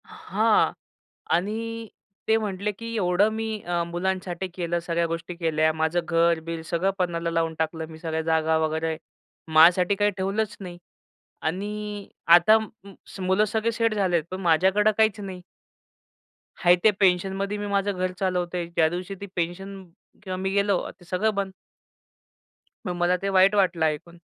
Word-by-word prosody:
हां - - +1 0.6
आणि 225 +5 -3 0.4
ते 220 - +4
म्हटले, 210 -1 -2
की 230 +3 -7
एवढं 190 0 +3
मी 220 -1 -3
अ, 175 -1 -1
मुलांसाठी 185 +1 -3
केलं, 175 -1 -2
सगळ्या 170 0 -1
गोष्टी 165 +1 -5
केल्या 160 -2 +1
माझं 160 +2 0
घर-बीर 165 -1 +1
सगळं 180 +3 0
पनाला 170 -2 -1
लावून 165 -1 0
टाकलं 160 0 -2
मी 160 -1 -11
सगळ्या 160 -1 -2
जागा 160 0 +2
वगैरे 160 0 -1 0.6
माझ्यासाठी 175 +4 +6
काही 205 +1 +2
ठेवलंच 195 +3 -1
नाही 180 -3 -8 0.7
आणि 205 +4 -4 0.3
आता 205 +6 +6
म 220 - -5 0.6
मुलं 190 +3 +3
सगळे 220 +2 -1
सेट 230 -1 +1
झाले 185 -5 +2
पण 185 - -4
माझ्याकडे 190 +5 +3
काहीच 220 -1 +3
नाही. 190 -3 -7 1.2
आहे 175 +1 +8
ते 220 - +7
पेन्शनमध्ये 195 +2 +1
मी 205 0 -4
माझं 200 0 +1
घर 185 0 -1
चालवतो 180 -2 -1
आहे 175 - -2
ज्या 170 -2 +2
दिवशी 180 +3 -5
ती - - -4
पेन्शन 190 +3 -4 0.4
किंवा 185 -2 -4
मी 190 +1 -2
गेलो 200 -2 +2 0.2
ते 175 - -17
सगळं 205 +5 0
बंद. 200 -1 -2 1.4
मग 180 - -1
मला 175 +1 +2
ते 195 - -1
वाईट 195 +1 +5
वाटलं 180 -5 +2
ऐकून 155 +3 -3
185 Hz, 155 wpm, -25 LUFS, 170-200 Hz, 1.4 s, आहे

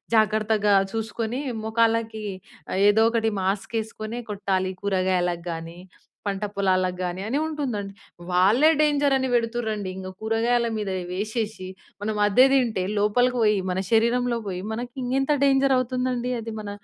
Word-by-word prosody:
జాగ్రత్తగా 215 -1 +2 0.2
చూసుకొని 225 +2 -3 0.3
మొఖాలకి 225 -1 +1 0.6
ఏదోకటి 225 +2 +3
మాస్క్ 195 +1 -1
ఏసుకొనే 220 +1 -6
కొట్టాలి. 190 -2 -1
కూరగాయలగాని, 175 -3 -1 0.5
పంట 200 0 -2
పొలాలగాని 185 -2 0
అని 255 +6 0
ఉంటుందండి. 245 -11 -3 0.4
వాళ్ళే 205 - +5
డేంజర్, 290 -2 +3
అని 260 0 -1
పెడుతుర్రండి. 225 -4 -1
ఇంక 185 0 -6
కూరగాయల 230 +2 +1
మీద 210 -2 -3 0.2
వేసేసి 210 0 -3 0.3
మనం 215 +1 -2
అదే 250 +6 +6
తింటే 235 -8 +2 0.2
లోపలికి 245 +5 +2
పోయి, 210 -2 +4
మన 180 +1 -1
శరీరంలో 235 +2 +2
బోయి 180 -2 -4
మనకి 240 +2 -5
ఇంకెంత 270 +3 +1
డేంజర్ 275 0 +4
అవుతుందండి, 250 0 -1
అది 225 0 -6
మన 210 -1 -6
220 Hz, 120 wpm, -24 LUFS, 195-240 Hz, 0.6 s, అదే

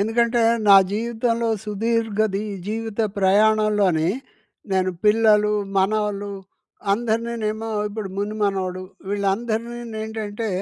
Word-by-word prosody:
ఎందుకంటే 235 +2 +2 0.3
నా 200 - +10 0.2
జీవితంలో 230 +1 -1 0.2
సుదీర్ఘ 225 +1 -1 0.2
ది 205 - -1 0.2
జీవిత 225 0 -3 0.2
ప్రయాణంలోని 200 -4 +3 0.6
నేను 185 0 +2
పిల్లలు, 210 -1 +4 0.3
మనవలు 205 0 0 0.6
అందరినీనేమో 225 0 -1 0.2
ఇప్పుడు 205 -1 -5
ముని 205 +2 -2
మనవడు 185 -2 -2 0.3
వీళ్ళందరినీ 220 +4 -1 0.3
ఏంటంటే 220 0 -4
215 Hz, 90 wpm, -22 LUFS, 200-225 Hz, 0.6 s, నా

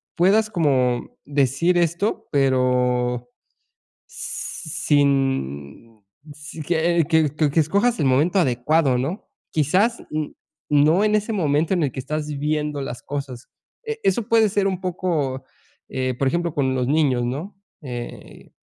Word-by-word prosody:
puedas 210 +5 +3
como 130 - 0
decir 145 +5 +1
esto, 170 +5 0
pero 125 -3 +1 0.8
sin 135 - -2 0.3
si 150 +2 -9
que 170 +1 +1
que 160 -3 +3
que 155 -2 +2
que 160 - +2
escojas 200 +10 +2
el 150 - +1
momento 145 +9 +2
adecuado, 135 -1 +2
¿no?, 160 - -4 0.2
quizás, 185 - +1
n 155 -1 -3 0.4
no 150 +6 +4
en 215 0 +3
ese 215 +2 -1
momento 160 -2 +1
en 175 - 0
el 140 - 0
que 130 - -6
estás 150 +3 -3
viviendo 150 0 -2
las 125 -3 -6
cosas, 135 -3 -6 0.4
e 450 0 -4
eso 195 +5 +2
puede 225 -2 +4
ser 200 0 +1
un 190 -2 -2
poco, 165 -8 -2 0.5
eh, 130 -1 -1
por 135 - +1
ejemplo, 170 +3 -1
con 130 -3 +1
los 125 -1 0
niños, 140 -5 +2
¿no?, 145 +11 -4 0.3
eh, 120 -3 -8
150 Hz, 140 wpm, -22 LUFS, 130-175 Hz, 0.8 s, no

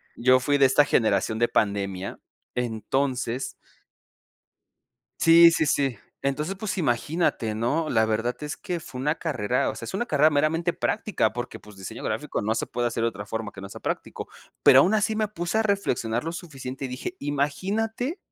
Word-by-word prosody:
Yo 130 +2 +4
fui 145 +3 +1
de 140 - +6
esta 135 +2 +5
generación 110 -3 +1
de 120 - +3
pandemia, 100 -2 -1 0.4
entonces 125 +2 -2 1.7
Sí, 170 +1 +8
sí, 160 -1 +1
sí. 135 -7 +1 0.2
Entonces, 150 +7 -1
pues 210 0 -3
imagínate, 135 -5 0
¿no? 120 +9 0
La 110 -1 +3
verdad 115 +3 0
es 150 0 -4
que 175 -2 -4
fue 130 -4 -9
una 150 +4 0
carrera 125 -7 -1
o - - -3
sea, - - -8
es - - -6
una 220 +6 -1
carrera 150 -2 +4
meramente 160 +4 +1
práctica 195 - 0
porque, 120 0 -5
pues, 105 -1 -15
diseño 95 -1 -8
gráfico - - -2
no 110 +2 0
se - - -1
puede 120 0 -2
hacer 115 - -2
de 115 - +2
otra 100 0 -8
forma 110 -1 -4
que 95 - -10
no 100 - -8
sea - - -11
práctico, - - -4 0.3
pero 130 - +8
aun 190 +9 +3
así 215 +1 +1
me 215 -1 0
puse 175 +1 -2
a - - +3
reflexionar 125 - 0
lo 165 - -3
suficiente 135 -6 -6
y - - -8
dije: 130 +8 -5
"Imagínate 205 - -1
135 Hz, 185 wpm, -25 LUFS, 115-170 Hz, 1.7 s, Sí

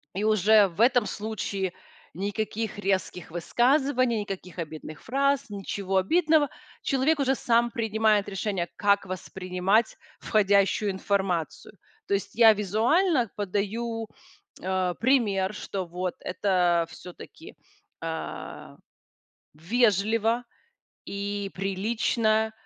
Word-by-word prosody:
И 200 - -1
уже 215 0 +5
в 175 +3 -10
этом 245 -1 +4
случае- 200 -3 -3 0.4
никаких 205 +3 -3
резких 190 -3 -2
высказываний, 250 - +1
никаких 190 -3 -7
обидных 155 -2 -7
фраз, 275 +2 +1
ничего 195 -1 -2
обидного. 310 - +3 0.3
Человек 280 +3 +1
уже 265 -1 +2
сам 235 0 +2
принимает 220 -2 +1
решение, 195 -3 -2
как 200 -1 +2
воспринимать 185 +3 -1 0.2
входящую 200 -1 +2
информацию. 190 -2 -2 0.3
То - - +2
есть 200 - -3
я 225 -1 +7
визуально 235 - +2
подаю, 215 +3 -2 0.5
э, 185 -1 -1
пример, 215 -6 +2
что 195 -2 -4
вот 180 +1 -4
это 180 -3 +1
всё-таки, 180 - -12 0.5
э, 165 -1 -6 0.8
вежливо 220 +6 +1 0.6
и 200 0 -4
прилично, 215 +3 0
205 Hz, 100 wpm, -26 LUFS, 190-230 Hz, 0.8 s, я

